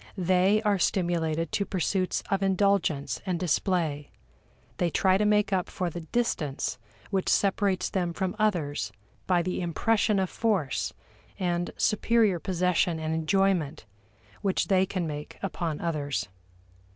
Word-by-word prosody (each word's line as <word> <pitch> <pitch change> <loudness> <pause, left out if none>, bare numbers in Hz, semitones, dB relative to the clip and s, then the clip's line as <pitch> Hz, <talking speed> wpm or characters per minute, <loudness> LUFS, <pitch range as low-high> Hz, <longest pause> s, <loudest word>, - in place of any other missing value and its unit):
They 185 +4 +3
are 205 -3 +2
stimulated 165 -4 0
to 200 - +1
pursuits 185 -1 -1
of 195 0 +1
indulgence 195 -6 +1
and 180 -3 -2
display; 165 -4 0 0.7
they 175 - +1
try 185 +3 +3
to 210 - +2
make 210 -1 +3
up 185 -2 0
for 180 -2 -2
the 175 - -6
distance 160 - -2 0.3
which 190 -2 0
separates 195 -1 +2
them 180 -3 -1
from 190 +3 -2
others 165 - 0 0.4
by 180 -2 +3
the 185 +1 -2
impression 205 +5 +1
of 190 -1 +1
force 200 - 0 0.5
and 175 -2 -1
superior 215 -3 +2
possession 180 -1 +1
and 160 0 -2
enjoyment 160 - +1 0.6
which 195 +1 0
they 190 -1 +4
can 185 -2 -2
make 150 -1 -6
upon 170 -5 -2
others. 145 - -2
180 Hz, 135 wpm, -27 LUFS, 165-195 Hz, 0.7 s, they